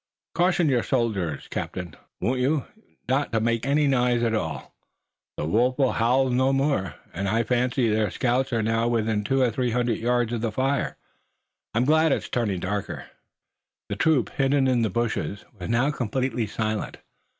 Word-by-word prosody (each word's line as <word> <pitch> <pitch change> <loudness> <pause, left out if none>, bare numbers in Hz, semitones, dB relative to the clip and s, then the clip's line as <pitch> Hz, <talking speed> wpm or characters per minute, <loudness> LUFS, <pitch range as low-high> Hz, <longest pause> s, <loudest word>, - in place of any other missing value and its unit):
Caution 175 -1 +2
your 125 -4 +3
soldiers, 105 - -1
captain, 90 -4 -5 0.2
won't 125 +2 0
you, 140 +3 +1 0.4
not 135 +2 0
to 115 - +1
make 115 +2 0
any 145 +2 +3
noise 125 -3 +2
at 115 -1 +1
all. 80 -8 -3 0.6
The - - -2
wolf 120 +9 +2
will 135 -3 +3
howl 125 +3 +2
no 130 +2 +2
more, 135 - 0 0.2
and 100 +3 -2
I 115 +3 +2
fancy 125 +1 +1
their 110 -1 +1
scouts 130 +2 0
are 115 -2 +1
now 115 +1 +1
within 110 -3 0
two 135 +5 +1
or 120 - +2
three 125 +2 -1
hundred 120 -1 0
yards 120 0 +1
of 115 - -2
the 115 -1 -1
fire. 135 +4 -1 0.8
I'm 120 +2 +3
glad 155 +2 +4
it's - - -1
turned 105 -7 -1
darker." 100 +2 -4 0.8
The - - -2
troop, 155 -6 +2
hidden 135 0 +2
in 125 -2 +2
the 110 - +1
bushes, 110 -1 -2
was 90 - -5
now 120 +5 +2
completely 125 -3 -1
silent. 110 +1 -3
120 Hz, 170 wpm, -25 LUFS, 110-130 Hz, 0.8 s, glad